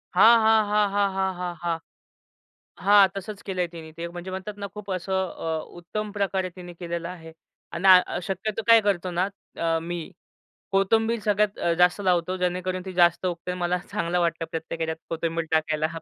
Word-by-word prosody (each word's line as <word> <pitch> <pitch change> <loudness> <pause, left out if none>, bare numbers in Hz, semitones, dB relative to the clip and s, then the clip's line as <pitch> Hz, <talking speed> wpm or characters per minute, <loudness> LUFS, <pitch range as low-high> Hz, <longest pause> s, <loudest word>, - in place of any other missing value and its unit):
हां, 225 +5 +8
हां, 220 0 +5
हां, 210 -1 +3
हां, 200 -1 +2
हां, 190 0 0
हां, 175 -1 -4
हां, 165 -1 -1 1.1
हां. 200 -1 +7
तसंच 200 +1 -6
केलंय 180 -3 -1
तिने 165 -2 -10
ते, 170 +1 -4
म्हणजे 175 +2 -7
म्हणतात 195 +2 -6
ना, - - -2
खूप 205 -2 -7
असं 185 +1 -3 0.2
अ, 160 -1 -3 0.2
उत्तम 210 +5 -5
प्रकारे 190 -2 0
तिने 175 -1 -9
केलेलं 170 -1 -5
आहे 165 -3 -10 0.4
आणि 190 +3 0
अ, 180 -1 +6
शक्यतो 200 +3 -2
काय 230 -1 +8
करतो 185 -2 0
ना, 180 +2 +1 0.3
अ, 165 -1 +1
मी 175 +1 -4 0.7
कोथिंबीर 220 +4 +2
सगळ्यात 210 -1 +2
अ, 170 - +1
जास्त 180 +3 +4
लावतो, 185 -1 +1
जेणेकरून 185 +1 -2
ती 190 - -6
जास्त 175 +1 +4
उगते. 180 0 -3
मला 180 +1 +1
चांगलं 170 +1 0
वाटतं 165 -1 0
प्रत्येक 165 0 -5
याच्यात 160 0 -2
कोथिंबीर 165 0 -2
टाकायला 155 -1 +1
180 Hz, 175 wpm, -25 LUFS, 170-195 Hz, 1.1 s, हां